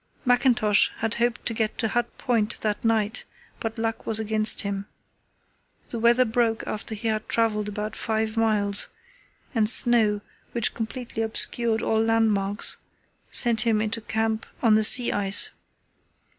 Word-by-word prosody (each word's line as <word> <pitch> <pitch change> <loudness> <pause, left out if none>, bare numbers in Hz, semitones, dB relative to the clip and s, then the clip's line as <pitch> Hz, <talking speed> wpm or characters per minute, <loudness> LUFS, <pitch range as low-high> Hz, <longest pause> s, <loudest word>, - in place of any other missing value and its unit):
Mackintosh 245 -4 +3
had 225 0 -2
hoped 240 0 -1
to 230 - -1
get 220 -1 -2
to 225 - -1
Hut 240 +1 -1
Point 230 -4 -1
that 210 -1 -2
night, 225 0 0 0.4
but 225 0 -5
luck 225 0 -4
was 220 -1 +3
against 215 0 +1
him. 200 0 -4 1.0
The 235 - -5
weather 240 +2 +4
broke 225 -1 0
after 215 +1 -4
he 220 +2 -4
had 215 -1 -2
travelled 210 -2 0
about 210 +1 -5
five 220 0 -2
miles, 210 -3 0 0.7
and 220 -3 +2
snow, 225 -4 +3 0.3
which 235 -2 +1
completely 230 0 -5
obscured 225 0 0
all 220 0 +1
landmarks, 220 -3 +1 0.5
sent 235 -3 +5
him 220 -1 +1
into 220 +1 -2
camp 220 0 -2 0.2
on 225 -2 +4
the 215 0 +3
sea 245 +3 +6
ice. 195 -1 +2
220 Hz, 145 wpm, -24 LUFS, 215-230 Hz, 1.0 s, sea